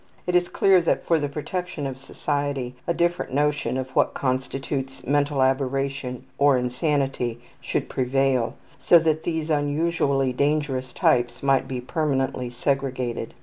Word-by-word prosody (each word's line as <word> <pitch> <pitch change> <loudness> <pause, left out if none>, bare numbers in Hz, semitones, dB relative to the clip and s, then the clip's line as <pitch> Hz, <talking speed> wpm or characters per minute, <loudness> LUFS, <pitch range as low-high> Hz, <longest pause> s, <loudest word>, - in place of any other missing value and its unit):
It 180 - 0
is 175 0 +3
clear 190 -2 +4
that 165 - 0
for 165 -2 +3
the 145 -1 -2
protection 170 +1 -4
of 135 -1 -3
society 140 -2 -2
a 170 - +2
different 175 -6 0
notion 145 -2 +1
of 130 0 -4
what - - +2
constitutes 135 +1 -3
mental 145 -1 +2
aberration 135 -1 -1 0.2
or 140 -2 +5
insanity 125 -2 -1 0.2
should - - -2
prevail, 130 -1 +1 0.2
so 175 - +6
that 160 -1 +1
these 160 -1 -1
unusually 145 -3 +1
dangerous 140 -2 0
types 120 +1 +1
might 135 -1 +3
be 130 -1 -3
permanently 135 -3 -1
segregated. 130 -1 -2
140 Hz, 140 wpm, -24 LUFS, 130-150 Hz, 0.2 s, so